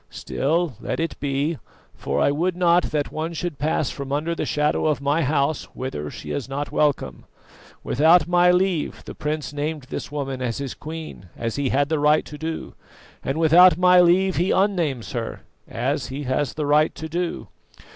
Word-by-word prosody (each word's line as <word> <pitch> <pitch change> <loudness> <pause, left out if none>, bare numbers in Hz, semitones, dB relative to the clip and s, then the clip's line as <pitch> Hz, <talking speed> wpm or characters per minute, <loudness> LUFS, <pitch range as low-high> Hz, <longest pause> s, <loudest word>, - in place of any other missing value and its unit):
Still, 160 +2 -1
let - - -3
it 165 0 -1
be, 145 +3 -1 0.3
for - - -3
I - - +3
would 170 +5 0
not 175 -1 +4
that 150 -2 -2
one 160 +2 -3
should 165 -2 -4
pass 150 -1 0
from 140 -1 -6
under 150 +4 -1
the - - -3
shadow 150 +1 +1
of 150 -5 +1
my 145 +4 +1
house 145 0 0
whither 75 - -4
she - - -8
is 135 -2 -4
not 145 +2 -4
welcome. 145 - 0 0.6
Without 160 +4 +4
my 175 0 +4
leave 180 -3 0
the - - -7
prince 150 -1 -4
named 150 0 -3
this - - -5
woman 135 -3 -4
as 120 -3 -2
his 140 -2 -4
queen, 155 - -8
as 115 -1 -3
he 140 -2 0
had 140 +2 +1
the 160 -2 0
right 150 +1 +3
to 150 - -10
do; 160 0 -5 0.5
and 135 +3 -2
without 170 +3 +7
my 180 0 +6
leave 185 +2 +3
he 180 +3 +1
unnames 170 - 0
her, 115 -2 -4 0.3
as 130 +2 -2
he 140 +3 -5
has 130 +1 -1
the 150 - -2
right 150 +2 +3
to 160 - -6
do. 170 +2 -3
150 Hz, 185 wpm, -23 LUFS, 140-165 Hz, 0.6 s, without